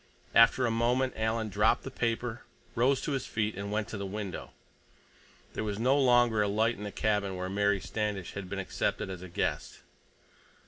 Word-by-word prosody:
After 115 Hz, +2 st, +6 dB
a 115 Hz, -, +1 dB
moment 125 Hz, +3 st, +1 dB
Alan 110 Hz, 0 st, -1 dB
dropped 105 Hz, +3 st, +2 dB
the 135 Hz, -, -6 dB
paper, 120 Hz, 0 st, -2 dB, 0.3 s
rose 130 Hz, +3 st, +2 dB
to -, -, -3 dB
his 135 Hz, -3 st, -2 dB
feet, 110 Hz, -1 st, -1 dB
and 100 Hz, +1 st, -5 dB
went 105 Hz, 0 st, -1 dB
to 110 Hz, -, -5 dB
the 100 Hz, -, -3 dB
window. 100 Hz, -2 st, -5 dB, 1.0 s
There -, -, -3 dB
was 105 Hz, -2 st, -3 dB
no 125 Hz, +5 st, +3 dB
longer 120 Hz, -5 st, +4 dB
a 105 Hz, -, +2 dB
light 110 Hz, +3 st, +1 dB
in 105 Hz, -, -9 dB
the 105 Hz, -, -5 dB
cabin 105 Hz, -3 st, 0 dB
where 90 Hz, 0 st, -3 dB
Mary 100 Hz, +1 st, +2 dB
Standish 105 Hz, -2 st, -3 dB
had 100 Hz, -2 st, -6 dB
been 100 Hz, -, -4 dB
accepted 95 Hz, 0 st, -2 dB
as 90 Hz, -2 st, -7 dB
a 95 Hz, -, -8 dB
guest. -, -, -2 dB
110 Hz, 190 wpm, -30 LUFS, 100-120 Hz, 1.0 s, After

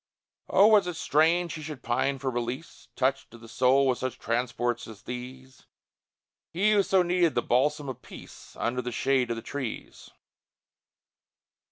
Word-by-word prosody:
Oh, 195 Hz, -, +6 dB
was 210 Hz, -4 st, +5 dB
it 180 Hz, -, -3 dB
strange 165 Hz, +3 st, +2 dB
he 155 Hz, -, -7 dB
should 150 Hz, -4 st, -8 dB
pine 130 Hz, +3 st, 0 dB
for 135 Hz, 0 st, -2 dB
release, 120 Hz, +6 st, -5 dB
Touched 135 Hz, +1 st, 0 dB
to 115 Hz, -, -13 dB
the 115 Hz, 0 st, -14 dB
soul 130 Hz, +4 st, +3 dB
with 125 Hz, -2 st, +1 dB
such 130 Hz, -1 st, -3 dB
transports 120 Hz, 0 st, -2 dB
as 110 Hz, -2 st, -12 dB
these, 130 Hz, +1 st, -9 dB, 0.8 s
He 200 Hz, +5 st, +2 dB
who 205 Hz, -1 st, +5 dB
so 190 Hz, -1 st, +3 dB
needed 175 Hz, -2 st, +2 dB
the -, -, +1 dB
balsam 145 Hz, +4 st, +1 dB
of 130 Hz, -1 st, -6 dB
peace, -, -, -13 dB
Under 125 Hz, +2 st, -1 dB
the 125 Hz, 0 st, -5 dB
shade 130 Hz, +1 st, +1 dB
of 115 Hz, -, -1 dB
the 115 Hz, -, -7 dB
trees? 130 Hz, -3 st, -6 dB
130 Hz, 165 wpm, -27 LUFS, 120-160 Hz, 0.8 s, Oh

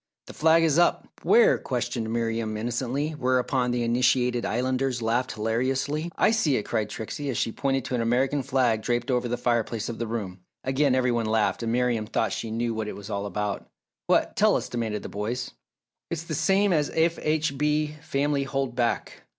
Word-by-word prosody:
"The -, -, -11 dB
flag 160 Hz, +1 st, +4 dB
is 160 Hz, 0 st, +3 dB
up!" 175 Hz, -, +2 dB
"Where?" 470 Hz, +2 st, +5 dB
questioned 115 Hz, -3 st, -2 dB
Miriam, 115 Hz, -2 st, -1 dB
innocently, 120 Hz, +6 st, -2 dB
whereupon 130 Hz, -2 st, +1 dB
the 120 Hz, 0 st, 0 dB
initiated 125 Hz, 0 st, +2 dB
Islanders 130 Hz, +1 st, 0 dB
laughed 120 Hz, +3 st, 0 dB
hilariously. 130 Hz, +8 st, -1 dB
"I -, -, +4 dB
see 195 Hz, -12 st, +2 dB
it!" 105 Hz, -, -2 dB
cried 110 Hz, -1 st, -1 dB
Trixie, 140 Hz, +6 st, -5 dB
as 125 Hz, -, -2 dB
she 115 Hz, -, 0 dB
pointed 135 Hz, +1 st, -1 dB
to -, -, -4 dB
an 120 Hz, -, +1 dB
American 130 Hz, +5 st, +1 dB
flag 125 Hz, -4 st, +1 dB
draped 120 Hz, +3 st, -1 dB
over 125 Hz, -1 st, +1 dB
the 120 Hz, +1 st, -2 dB
fireplace 120 Hz, -2 st, -1 dB
of 115 Hz, -, -6 dB
the 115 Hz, -, -2 dB
room. 100 Hz, -5 st, -4 dB, 0.2 s
Again 135 Hz, 0 st, +2 dB
every 125 Hz, -1 st, +2 dB
one 115 Hz, -2 st, 0 dB
laughed, 110 Hz, +1 st, +1 dB
and 115 Hz, -1 st, -1 dB
Miriam 120 Hz, -3 st, +1 dB
thought 115 Hz, -, 0 dB
she 115 Hz, -, -4 dB
knew 115 Hz, +1 st, -1 dB
what 110 Hz, -1 st, -3 dB
it -, -, -5 dB
was 100 Hz, +1 st, -9 dB
all 100 Hz, 0 st, -2 dB
about. 105 Hz, +1 st, -3 dB, 0.4 s
"What -, -, +2 dB
tell -, -, +4 dB
us?" -, -, -2 dB
demanded 115 Hz, -3 st, -3 dB
the -, -, -5 dB
boys. 115 Hz, +5 st, -3 dB, 0.6 s
"It's 165 Hz, -1 st, -3 dB
the 165 Hz, -, -5 dB
same 195 Hz, +5 st, +3 dB
as 150 Hz, -3 st, +1 dB
F. 165 Hz, +1 st, +2 dB
H. 155 Hz, -1 st, 0 dB
B. 150 Hz, +1 st, 0 dB
Family 145 Hz, -2 st, 0 dB
hold 135 Hz, -2 st, -2 dB
back!" 120 Hz, -2 st, -2 dB
125 Hz, 195 wpm, -26 LUFS, 115-140 Hz, 0.6 s, Where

